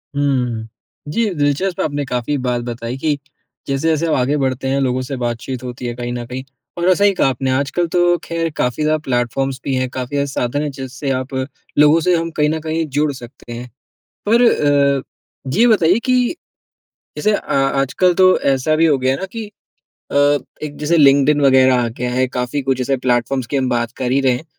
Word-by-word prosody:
हुँ, 145 - +1 0.4
हुँ। 110 - -8 0.4
जी, 230 +10 0
दिलचस्प 150 +4 0
आपने 145 -1 -1
काफ़ी 125 +3 -2
बात 125 -2 -1
बताई 120 +1 -5
कि 150 +1 0 0.5
जैसे-जैसे 155 +4 0
आगे 135 +4 +1
बढ़ते 130 -1 -1
हैं 135 +1 +1
लोगों 130 -1 0
से 130 +2 -5
बातचीत 120 +2 -4
होती 125 0 -6
है 120 - -2
कहीं 120 0 -4
न 120 -1 -4
कहीं 125 +2 -6 0.3
और 175 +2 +3
सही 200 +1 +3
कहा 180 - +2
आपने 130 0 -1
आजकल 140 +6 0
तो 175 0 +4
खैर 165 0 -2
काफ़ी 125 +5 0
ज़्यादा 155 +1 +2
प्लेटफ़ॉर्म्स 130 +2 -1
भी 135 - -2
हैं 130 0 -1
काफ़ी 130 +2 -5
ज़्यादा 140 0 +1
साधन 130 +2 -1
है 150 - -2
जिससे 135 0 -6
आप 130 +1 -3 0.4
लोगों 150 +2 +6
से 180 +2 +3
हम 165 0 -1
कहीं 150 0 +3
न 160 +1 -1
कहीं 160 +1 -2
जुड़ 150 0 +2
सकते 120 -1 -12
हैं। 120 +1 -7 0.6
पर 230 +2 +5
अ, 140 - +3 0.6
ये 235 +2 +6
बताइए 190 -3 +4
कि 255 +4 +2 0.8
जैसे 215 - +1
अ, - - +1
आजकल 135 +6 +2
तो 185 +1 +5
ऐसा 135 +3 +1
भी 165 +1 +4
हो 145 -4 +3
गया 130 0 +1
है 135 - -2
ना 190 - -3
कि 225 -1 -5 0.7
अ, - - -6 0.5
एक 150 -1 -5
जैसे 150 +3 +1
लिंक्डइन 140 0 +5
वग़ैरह 130 -2 +5
आ - - 0
गया 125 +2 -4
है 130 +1 +1
काफ़ी 125 +3 -2
कुछ 130 -1 -1
ऐसे 135 +2 0
प्लेटफ़ॉर्म्स 125 0 0
की 140 - -2
हम 130 -1 0
बात 120 -1 -1
कर 125 -1 -2
ही 135 - +3
रहे 130 -2 +3
हैं 125 +6 -4
135 Hz, 205 wpm, -18 LUFS, 130-155 Hz, 0.8 s, लोगों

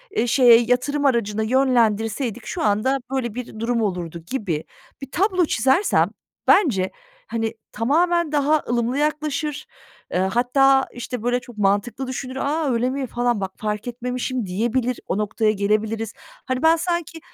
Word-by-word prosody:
eee, 245 - +1
şeye 240 -2 +7
yatırım 250 +5 0
aracına 220 -5 +1
yönlendirseydik 230 -2 +1
şu - - -4
anda 215 +6 +2
böyle 245 -5 -2
bir 240 -3 -7
durum 230 0 0
olurdu." 175 -5 -3
gibi 180 - -2 0.4
bir 275 -1 -8
tablo 370 -2 +2
çizersem 270 - +2 0.4
bence, 200 - +4 0.4
hani, 225 -1 -2 0.2
tamamen 330 +7 +1
daha 295 +1 +2
ılımlı 240 +2 0
yaklaşır. 300 0 -1 0.5
Eee, - - 0
hatta, 255 +7 +3
işte, 245 -1 -6
böyle, 245 0 +1
çok 245 -3 -14
mantıklı 205 +6 0
düşünür, 260 0 -5
"A, 290 +1 0
öyle 240 +2 +1
mi?" 265 0 -3
falan 240 -3 0
"Bak 190 -1 -3
fark 210 +2 -3
etmemişim." 250 0 -3
diyebilir, 235 +6 -1
o - - -1
noktaya 215 +1 +1
gelebiliriz. 215 +2 -1 0.3
Hani, 255 +2 -2
ben 325 +1 +6
sanki, 340 -1 -3
245 Hz, 145 wpm, -22 LUFS, 220-275 Hz, 0.5 s, şeye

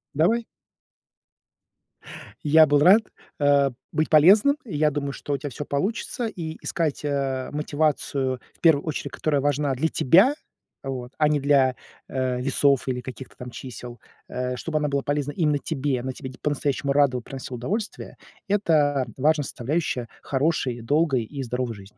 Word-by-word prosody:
Давай. 215 +11 +2 2.0
Я 155 +1 +7
был 145 0 +4
рад, 190 +9 +7 0.4
э, 140 -1 +4 0.2
быть 155 - 0
полезным. 200 - +6
Я 150 -7 +1
думаю, 140 -1 -3
что 145 - -4
у 140 - 0
тебя 145 +2 -5
всё 145 +4 -6
получится: 225 - -2
и 160 -6 -6
искать, 155 -4 -2
э, 135 -3 -1
мотивацию, 145 -3 -1
в - - -28
первую 160 -4 +4
очередь, 155 - -4
которая 145 -3 0
важна 145 0 +1
для 150 +6 0
тебя, 190 - +4 0.5
вот, 130 -2 -5
а 150 - +3
не 150 -1 +2
для, 135 -2 +3 0.3
э, 130 -1 -1
весов 140 +1 +2
или 125 -1 -2
каких-то 130 0 -9
там 125 0 -8
чисел, 120 -1 -9 0.3
э, 125 0 -3
чтобы 155 +4 -3
она 150 -1 0
была 140 0 0
полезна 145 0 -1
именно 150 -1 +1
тебе, 140 -3 -2
она 130 +1 -3
тебя 130 0 -8
по-настоящему 145 -1 -1
рада 140 -3 +3
и - - -5
приносила 130 0 -7
удовольствие. 205 - -4 0.3
Это 150 -9 +2
важная 150 +2 +2
составляющая 130 -1 -2
хорошей, 135 -4 -1
долгой 140 0 +1
и 140 +5 -7
здоровой 125 -1 -3
жизни. 100 0 -14
145 Hz, 155 wpm, -24 LUFS, 130-155 Hz, 2.0 s, Я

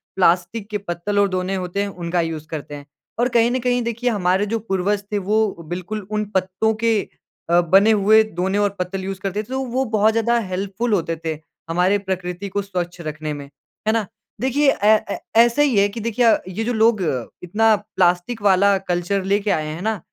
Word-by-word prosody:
Plastic 185 +4 +1
के 210 - -1
पत्तल 200 +1 -2
और 200 -1 +3
ढोने 185 +1 -2
होते 185 +1 -2
हैं 205 - -1
उनका 175 -2 -2
यूज़ 160 -2 -4
करते 150 -2 -6
हैं। 145 -1 -10 0.3
और 240 - +3
कहीं 235 -1 +3
न 255 - 0
कहीं 245 0 +1
देखिए 235 +1 -1
हमारे 190 -2 +1
जो 225 +2 -2
पूर्वज 200 -1 -1
थे 210 - 0
वो 205 -2 0
बिल्कुल 185 +3 -5
उन 210 0 -1
पत्तों 190 +4 +1
के 225 -2 +3 0.5
अ, 175 +1 +5
बने 195 +6 +5
हुए 215 +1 +5
ढोने 190 +3 0
और 205 0 +2
पत्तल 185 +1 -3
यूज़ 190 0 -5
करते 195 +1 -2
थे - - -19
तो 265 +1 -3
वो 255 +2 -1
बहुत 215 +1 +4
ज़्यादा 230 +1 +1
हेल्पफ़ुल 200 +3 -2
होते 165 -4 0
थे, 160 -2 -2 0.3
हमारे 180 +4 +2
प्रकृति 190 -1 -4
को 200 +2 -1
स्वच्छ 180 -3 -4
रखने 155 -1 -4
में, 145 -1 -7 0.4
है 220 - +3
ना? 225 -2 0 0.4
देखिए 275 +3 +3
ए 215 +1 +7 0.2
ए - - -2 0.2
ऐसा 235 +4 +5
ही 275 -7 +3
है 200 0 +5
कि 205 - -7
देखिए 230 +2 +1 0.3
ये 225 - 0
जो 245 +2 -1
लोग 220 -2 +3 0.4
इतना 215 +5 +3 0.2
प्लास्टिक 180 +5 +1
वाला 200 0 +4
कल्चर 180 +2 0
लेके 200 +2 +1
आए 155 -4 0
हैं 155 +3 -6
ना, 215 0 -1
200 Hz, 205 wpm, -21 LUFS, 180-220 Hz, 0.5 s, ए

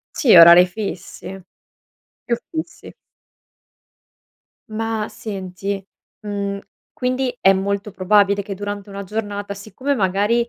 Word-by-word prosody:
Sì, 240 -8 +4
a 170 - +11
orari 170 +2 +9
fissi. 195 0 -7 0.8
Più 235 - 0 0.2
fissi. 320 +1 -6 1.8
Ma, 220 0 -3
senti, 195 -1 -5 0.4
mhmm, 200 -1 -3 0.3
quindi 255 0 -2
è 195 - +6
molto 200 +2 -2
probabile 200 +1 +2
che 200 0 -6
durante 205 +1 -6
una 200 0 -6
giornata, 205 0 -4
siccome, 215 +8 -3
magari, 205 +4 +1
200 Hz, 110 wpm, -20 LUFS, 195-220 Hz, 1.8 s, a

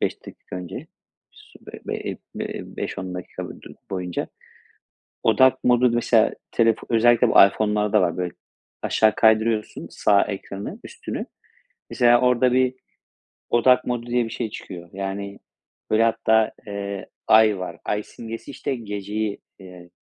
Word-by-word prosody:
5 - - -3
dakika - - -9
önce 90 -1 -7 0.4
sü - - -18
be - - -10
be - - -2
eee, - - -5 0.2
be - - -3
eee, - - -5
5-10 95 -1 -4
dakika 90 - -7 0.2
du - - -12 0.2
boyunca 90 -2 -3 0.9
odak 130 0 +4
modu 125 0 +4
mesela 115 -1 +3 0.2
telefon 115 -1 +2
özellikle 120 +1 +5
bu - - 0
iPhone'larda 105 +1 +1
var 90 -2 +1
böyle 90 -1 -3 0.5
aşağı 110 -1 +3
kaydırıyorsun 110 0 +2
sağ 100 -1 +3
ekranı 100 - -6
üstünü 475 - -6 0.6
mesela 120 -1 +4
orada 125 0 +3
bir 130 0 +2 0.7
odak 125 +2 +4
modu 120 -1 -2
diye 120 0 +1
bir - - -6
şey 115 0 -4
çıkıyor 90 -4 -9
yani 100 +1 -5 0.5
böyle 110 +1 +4
hatta, 110 -1 +2 0.2
eee, 100 -1 -5 0.2
ay 110 -3 +5
var 85 -2 -6
ay 105 0 -1
simgesi, 115 +5 -8
işte, 135 0 -3
geceyi, 105 -1 -4 0.2
eee, 90 -2 -13
110 Hz, 140 wpm, -23 LUFS, 100-120 Hz, 0.9 s, özellikle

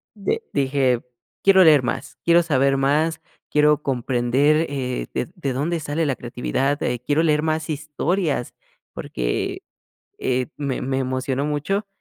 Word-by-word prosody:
de 215 - -1
dije: 135 -3 +1 0.4
"Quiero 190 -2 +7
leer 150 -5 +6
más, 120 - -4
quiero 170 0 +5
saber 140 -4 +2
más, 150 +4 +1 0.3
quiero 150 0 +3
comprender, 135 +4 +1
eh, 125 - -3
ded - - -2
de 135 - -3
dónde 155 +6 -1
sale 155 +2 -1
la 140 -3 0
creatividad, 130 +4 -2
eh, 120 -1 -1
quiero 150 +3 +2
leer 150 -2 +3
más 155 +1 -1
historias", 150 -1 -1 0.4
porque, - - -3 0.6
eh, 130 0 0
me 140 -3 -2
me 135 +1 -1
emocionó 130 +1 -1
mucho 195 +8 -1
145 Hz, 140 wpm, -22 LUFS, 130-155 Hz, 0.6 s, Quiero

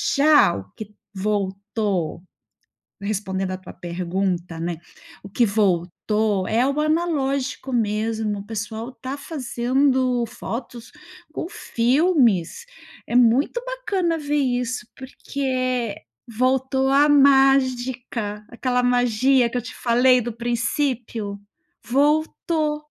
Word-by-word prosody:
Já 290 - +5
o 100 0 -8
que 215 - -6
t 210 - -25 0.2
voltou 200 -3 -2 0.8
respondendo 195 -2 -2
a 185 - -3
tua 185 - -12
pergunta, 175 0 -3
né. 170 0 -3 0.5
O 200 - -10
que 235 +5 +2
voltou 200 0 0
é 230 +3 +2
o 280 +2 -1
analógico 280 -5 -1
mesmo. 215 -1 -1
O 200 - -9
pessoal 220 +2 -5
está 260 +2 -7
fazendo 255 -3 0
fotos 235 +1 -7 0.4
com - - -4
filmes. 260 - +1 0.4
É - - -3
muito 250 - +3
bacana 395 -10 -1
ver 295 -1 -2
isso, 250 -3 -1
porque, 270 +1 -8
eh, 255 -4 0 0.3
voltou 265 +3 +1
a 285 +2 +5
mágica. 260 -6 +2
Aquela 250 +1 0
magia 245 +1 +3
que 250 - -3
eu - - -1
te 230 0 -9
falei 250 +1 +3
do 240 +1 -4
princípio. 235 -2 -2 0.5
Voltou. 300 +3 +1
245 Hz, 110 wpm, -22 LUFS, 210-270 Hz, 0.8 s, Já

